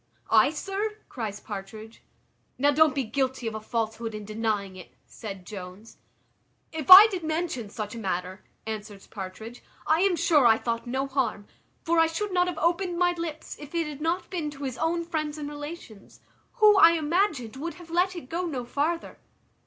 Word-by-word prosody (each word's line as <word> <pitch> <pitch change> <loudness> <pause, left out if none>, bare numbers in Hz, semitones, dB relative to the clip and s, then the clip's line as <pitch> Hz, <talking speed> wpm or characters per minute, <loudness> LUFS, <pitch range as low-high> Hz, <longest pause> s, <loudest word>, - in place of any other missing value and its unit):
"I, 225 +5 +6
sir?" 395 +7 -3
cries 215 -5 -5
Partridge. 215 +2 -9 0.6
"Now 285 +2 +3
don't 305 -1 +4
be 275 - 0
guilty 260 +2 -2
of 225 - -2
a 220 - -5
falsehood 225 0 -3
in 210 -1 -7
denying 215 -3 -2
it," 185 - -13
said 195 -5 -9
Jones. 190 +2 -10 0.7
"If 315 -1 -6
I 380 +3 +13
did 380 -6 -3
mention 315 -8 -2
such 210 -1 -6
a 235 - -7
matter," 185 -1 -4 0.2
answers 210 -2 -7
Partridge, 220 +4 -8 0.2
"I 315 +1 +3
am 390 -2 +3
sure 300 -5 +4
I 225 -1 +5
thought 230 0 -3
no 265 +3 -1
harm; 265 -7 -2 0.4
for 335 -1 +2
I 325 - +5
should 375 +5 -3
not 360 0 +3
have 355 -3 -3
opened 345 +2 0
my 355 0 +3
lips, 335 -3 -6
if 295 +3 -10
it 335 -1 +1
had 300 -1 -7
not 340 +3 -1
been 330 -5 -2
to 285 -1 -9
his 260 -2 -4
own 335 +1 0
friends 310 -3 -3
and 295 -1 -5
relations, 290 - -9 0.3
who, 425 -4 +6
I 335 -3 +8
imagined, 315 - 0
would 335 +5 -5
have 350 -2 -13
let 365 +2 +1
it 335 -7 -8
go 350 +5 -2
no 260 -7 -4
farther." 310 +7 -2
285 Hz, 185 wpm, -26 LUFS, 220-335 Hz, 0.7 s, I